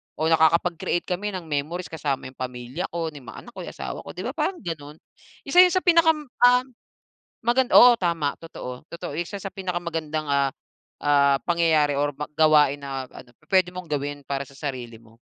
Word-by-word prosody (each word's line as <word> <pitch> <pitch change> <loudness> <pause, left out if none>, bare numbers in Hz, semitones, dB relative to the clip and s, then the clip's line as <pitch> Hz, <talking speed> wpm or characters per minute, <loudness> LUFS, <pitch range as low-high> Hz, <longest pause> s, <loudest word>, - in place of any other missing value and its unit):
oo, 160 +1 0
nakakapag-create 170 +2 +2
kami 195 +2 -3
ng 180 - -5
memories 155 +5 -3
kasama 145 -4 -3
yung 130 - -29
pamilya 125 +5 -5
ko, 165 -2 -2
ni 145 - -10
mga 120 -3 -11
anak 240 - -12
ko, - - -8
yung - - -7
asawa - - -5
ko, - - -10
'di - - -5
ba, - - -3
parang 375 - -2
ganun, 150 -3 -6 0.5
isa 320 +5 +3
yun 360 -1 +8
sa 370 - +1
pinakam 325 -3 +4 0.2
ah. 250 +1 +6 0.8
Oo, 245 0 +6
tama, 165 -5 0
totoo, 125 -4 -8
totoo 170 -3 -6
siya 195 +4 -6
sa 195 - -5
pinakamagandang, 170 -5 -3
ah, 140 -1 +2 0.5
ah, 140 -1 +4
pangyayari 160 -4 +2
or 145 0 +1 0.3
gawain 150 -3 +4
na 135 -1 -5
ano, 125 - -13 0.2
pwede 185 -1 +4
mong 180 -1 -6
gawin 145 0 -3
para 140 0 -2
sa 140 - -17
sarili 125 -6 -5
mo. 115 0 -21
160 Hz, 180 wpm, -24 LUFS, 140-180 Hz, 0.8 s, yun